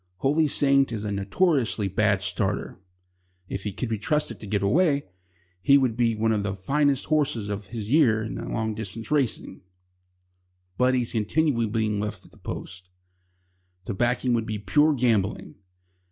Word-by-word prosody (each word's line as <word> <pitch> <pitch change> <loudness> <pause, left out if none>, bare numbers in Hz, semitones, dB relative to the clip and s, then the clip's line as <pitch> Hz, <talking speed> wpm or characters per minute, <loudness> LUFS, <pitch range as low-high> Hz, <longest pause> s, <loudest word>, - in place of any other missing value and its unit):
Holy 145 - +2
Saint 140 -2 +3
is 110 -2 -4
a 105 - -2
notoriously 110 - +1
bad 100 0 +1
starter. 90 0 -2 0.7
If 95 +2 -5
he 105 - -1
could 125 +6 -4
be 110 -2 -2
trusted 150 +6 -1
to 110 - -9
get 100 -1 -1
away, 145 - +2 0.6
he 140 +8 +6
would 130 -5 +1
be 115 -2 +1
one 110 +1 +1
of 105 -2 +1
the 100 -1 -2
finest 140 +7 +1
horses 145 -9 0
of 100 -1 -5
his 110 -1 -6
year 120 -8 +4
in 110 - -5 0.2
long 110 -1 -1
distance 110 +3 -6
races. 140 -6 -1 1.2
But 125 +5 +3
he 125 - +2
is 120 - -2
continually 115 +2 +1
being 105 -1 -1
left 105 0 -4
at - - -18
the - - -19
post. 95 -1 -8 1.0
To 115 - -3
back 120 +6 +1
him 125 - +2
would 115 -1 0
be 110 - -3
pure 145 - +3
gambling. 110 -6 0
115 Hz, 170 wpm, -25 LUFS, 105-135 Hz, 1.2 s, he